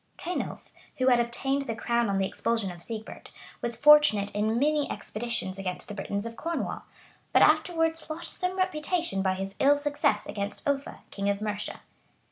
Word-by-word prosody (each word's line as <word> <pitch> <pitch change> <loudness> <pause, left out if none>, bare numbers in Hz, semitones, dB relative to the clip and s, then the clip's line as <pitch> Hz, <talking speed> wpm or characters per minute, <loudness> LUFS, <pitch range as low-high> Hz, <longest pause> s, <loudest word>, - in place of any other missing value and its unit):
[*] - - -38
Cenulph, 355 +1 -5 0.2
who 260 -1 +3
had 245 -1 +5
obtained 270 +4 0
the 225 - -2
crown 235 -1 0
on 195 - +1
the 195 - +2
expulsion 225 -1 -1
of 175 -1 -11
Sigebert, 220 +2 -7 0.3
was 235 -1 -2
fortunate 290 -7 +6
in 215 +2 +1
many 295 +2 +2
expeditions 215 -4 -4
against 185 -2 -4
the - - -6
Britons 200 +1 -3
of 230 0 -6
Cornwall; 335 +7 -3 0.5
but - - +6
afterwards 325 -2 +2
lost 330 +2 -4
some 365 0 -1
reputation 345 - 0
by 190 -1 +1
his 195 +1 -5
ill 285 +1 +5
success 290 0 0
against 200 +5 -4
Offa, 280 0 -2
king 200 0 -1
of 200 0 0
Mercia. 210 -1 -4
235 Hz, 175 wpm, -28 LUFS, 205-300 Hz, 0.5 s, fortunate